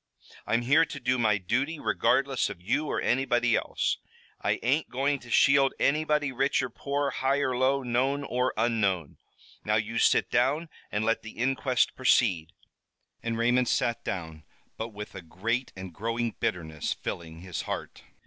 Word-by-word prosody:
"I'm 115 +1 +1
here 145 +6 +5
to 145 - -5
do 125 0 0
my 110 -3 +3
duty, 130 - -1
regardless 135 -2 +1
of - - -8
you 120 +12 -1
or - - -1
anybody 120 -2 +2
else. - - -1 0.4
I - - 0
ain't 140 +7 +1
going 140 +2 0
to 120 - -14
shield 140 +2 +4
anybody, 150 -1 +2
rich 135 +2 +1
or 125 - -4
poor, 140 +3 -2
high 135 +2 +1
or 130 -3 0
low, 130 +2 +2
known 130 +4 0
or 125 -1 0
unknown! 100 -8 0 0.5
Now, 105 - +1
you 110 +2 -1
sit - - +3
down, 150 +7 +1 0.2
and 105 +1 -1
let 115 +1 +1
the 110 - -11
inquest 130 +1 +1
proceed." 95 -11 +2 0.7
And 115 -1 -2
Raymond 125 +2 +2
sat 120 0 0
down, 80 -4 -5 0.3
but 110 - -4
with 105 -1 -8
a 95 - -7
great 115 +10 -2
and 95 -2 -8
growing 115 +4 -2
bitterness 80 -4 -2
filling 80 -1 -6
his 90 -2 -4
heart. - - -5
120 Hz, 165 wpm, -28 LUFS, 105-135 Hz, 0.7 s, here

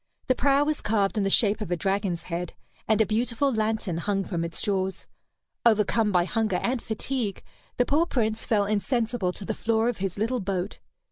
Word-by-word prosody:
The 255 - +3
prow 275 +2 +3
was 305 0 -1
carved 205 -2 +1
in - - +1
the 195 - +1
shape 210 +1 +3
of 210 - -3
a 175 - +1
dragon's 190 -1 -1
head, 175 0 -4 0.3
and 220 -1 +3
a 220 - +5
beautiful 235 +5 0
lantern 215 -5 -1
hung 195 +2 0
from 170 -3 -3
its 165 0 -2
jaws. 190 -2 -1 0.6
Overcome 215 -1 +3
by 175 -2 +3
hunger 215 0 0
and 245 -1 0
fatigue, 220 -2 -3 0.3
the 245 - +3
poor 315 +6 +2
Prince 220 -5 0
fell 210 -4 +2
insensible 220 -1 0
to 195 - -7
the 220 - -2
floor 225 +2 +1
of 245 - -3
his 190 -1 -3
little 230 +5 0
boat. 190 -1 -3
215 Hz, 195 wpm, -26 LUFS, 195-235 Hz, 0.6 s, a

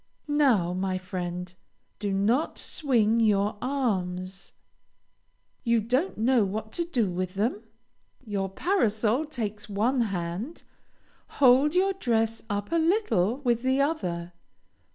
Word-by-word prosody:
Now, 260 - +3
my 185 0 -1
friend, 180 -1 -5 0.5
do 205 -2 -2
not 220 +10 +1
swing 230 -6 +1
your 210 -2 +2
arms. 195 -8 -2 1.1
You 235 -2 +3
don't 255 - 0
know 235 +1 +3
what 215 +2 -4
to 340 - -2
do 235 - 0
with 185 +1 -3
them? 210 +2 0 0.6
Your 200 -3 -2
parasol 230 - +1
takes 215 -8 -5
one 230 +6 +1
hand; 195 - -3 0.7
hold 275 +4 +5
your 385 +2 +3
dress 225 - 0
up 205 +4 -3
a 335 - +2
little 320 - +1
with 240 -2 +2
the 260 +2 +1
other. 180 - -1
220 Hz, 120 wpm, -27 LUFS, 195-265 Hz, 1.1 s, hold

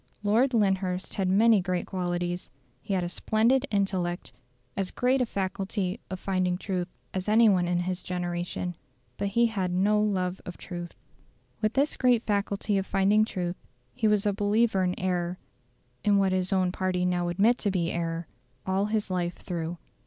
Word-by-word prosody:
Lord 235 +5 +3
Lyndhurst 190 -3 0
had 190 -2 0
many 210 +2 +5
great 180 -1 -1
qualities: 175 -1 -2 0.3
he 205 -2 -2
had 180 - 0
a - - -1
splendid 230 +9 +2
intellect 190 -3 -1 0.4
as 195 -2 -1
great 255 +2 +1
a 250 - +1
faculty 195 0 -2
of 185 - -5
finding 185 -2 0
truth 185 -2 -2 0.3
as 190 +2 -2
any 225 +2 +6
one 180 -4 +3
in 175 0 +1
his 185 +1 -2
generation; 175 0 -3 0.4
but 200 - -1
he 235 +4 +3
had 195 -6 -1
no 205 +4 +3
love 185 -3 0
of 180 - -8
truth. 175 -2 -7 0.7
With 215 0 +1
this 280 +2 +1
great 245 -3 +3
faculty 200 0 0
of 190 - -4
finding 205 +3 +3
truth, 180 -4 -3 0.4
he 220 - +1
was 210 -1 +2
a 205 - +2
believer 205 0 +2
in 180 0 -1
error 180 -1 -1 0.7
in 205 -1 +4
what 195 -1 +3
his 185 0 0
own 185 -2 +2
party 185 -1 0
now 175 -1 +1
admit 210 +8 +3
to 205 - 0
be 180 -3 0
error 165 0 -2 0.4
all 190 +1 +1
his 210 -2 -1
life 175 -1 -1
through. 170 -1 -4
190 Hz, 175 wpm, -28 LUFS, 180-210 Hz, 0.7 s, any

